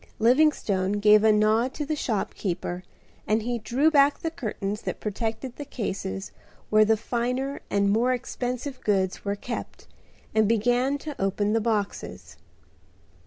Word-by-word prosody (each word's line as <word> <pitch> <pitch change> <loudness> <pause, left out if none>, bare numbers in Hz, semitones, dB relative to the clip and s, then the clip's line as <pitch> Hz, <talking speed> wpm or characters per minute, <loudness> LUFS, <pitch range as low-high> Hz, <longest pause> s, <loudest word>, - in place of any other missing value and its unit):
Livingstone 225 -7 +3
gave 210 +1 +5
a 220 - +6
nod 215 +4 +2
to 295 - -3
the 310 +2 -1
shopkeeper 190 - -3 0.4
and 215 +1 +2
he 240 +1 -2
drew 260 +8 +2
back 285 -1 +5
the 325 - -3
curtains 210 -7 -4
that - - -4
protected 225 +4 -3
the 290 - -5
cases 145 - -4 0.4
where 215 0 +6
the 220 +1 +3
finer 250 +5 -2
and 200 0 +2
more 235 +4 +2
expensive 250 +2 -3
goods 190 -3 0
were 200 0 -1
kept 235 +4 -6 0.5
and 220 -1 +3
began 245 +5 +2
to 295 0 -7
open 205 +2 +1
the 225 - +2
boxes. 215 -3 -3
225 Hz, 145 wpm, -26 LUFS, 205-255 Hz, 0.5 s, a